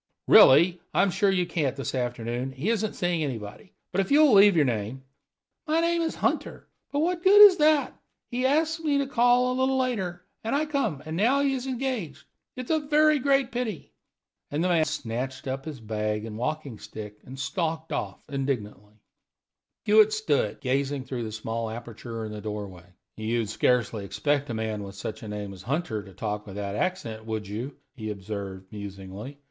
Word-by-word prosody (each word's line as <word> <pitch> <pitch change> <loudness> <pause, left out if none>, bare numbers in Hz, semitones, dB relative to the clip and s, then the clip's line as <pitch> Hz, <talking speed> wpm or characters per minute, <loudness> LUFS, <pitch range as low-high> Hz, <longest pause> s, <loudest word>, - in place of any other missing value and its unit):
"Really, 170 +6 +7
I'm 195 0 +4
sure 195 +2 +2
you 185 -2 +2
can't 145 -7 -1
this 135 - -4
afternoon; 120 0 -3
he 150 +12 -1
isn't 215 -2 -1
seeing 175 -3 0
anybody. 120 - -6 0.2
But 195 - +2
if 190 - -4
you'll 295 -2 +6
leave 200 -1 +7
your 155 -3 +4
name 120 +2 -3 0.3
" - - -50
"My 315 +2 +2
name 335 0 +2
is 325 - -1
Hunter; - - -2 0.2
but 285 - 0
what 345 +2 +1
the 345 - -23
good 415 0 +10
of 370 - -5
that? 300 -1 +3 0.4
He 245 +1 -1
ask 320 +3 +1
me 290 -2 +2
to 280 - +1
call 245 -1 +3
a 255 - -2
little 265 0 +2
later, 195 -9 -2 0.2
and 225 +4 -1
I 300 +2 +1
come, 225 - -1
and 160 +1 -4
now 245 +10 +3
he 280 -1 +2
is 260 0 -3
engaged. 250 - -3 0.3
It 255 - -4
is - - -4
a 315 - +3
very 305 0 +3
great 275 -1 +2
pity." 235 -8 -4 0.6
And 150 +3 -1
the 180 - +1
man 165 -3 +3
snatched 130 -3 -4
up 135 +1 -3
his 155 -5 -6
bag 105 -1 -2
and 110 -1 -7
walking 135 0 -3
stick, 105 -1 -9
and 130 +2 -10
stalked 160 +1 -2
off, 95 -1 -4
indignantly. 110 -7 -4 0.9
Hewitt 215 0 +6
stood 155 - +1
still, - - -24
gazing 135 +1 -1
through 125 -3 -4
the 110 - -5
small 110 +1 -3
aperture 115 0 -7
in 110 - -6
the 105 0 -7
doorway. 100 -4 -7 0.3
"You'd 110 0 -1
scarcely 115 -1 +1
expect 145 +7 -1
a 115 - -2
man 110 -1 -2
with 100 0 -8
such 95 +2 -6
a 110 - -8
name 105 -1 -5
as 95 - -11
Hunter 125 - -2
to 100 -1 -14
talk 105 +1 -4
with 100 - -8
that 100 -1 -4
accent, 115 - -2
would 110 -2 -3
you?" 120 +8 -5 0.2
he 110 -4 -5
observed, 100 -2 -6
musingly. 100 +5 -8
140 Hz, 195 wpm, -26 LUFS, -, 0.9 s, good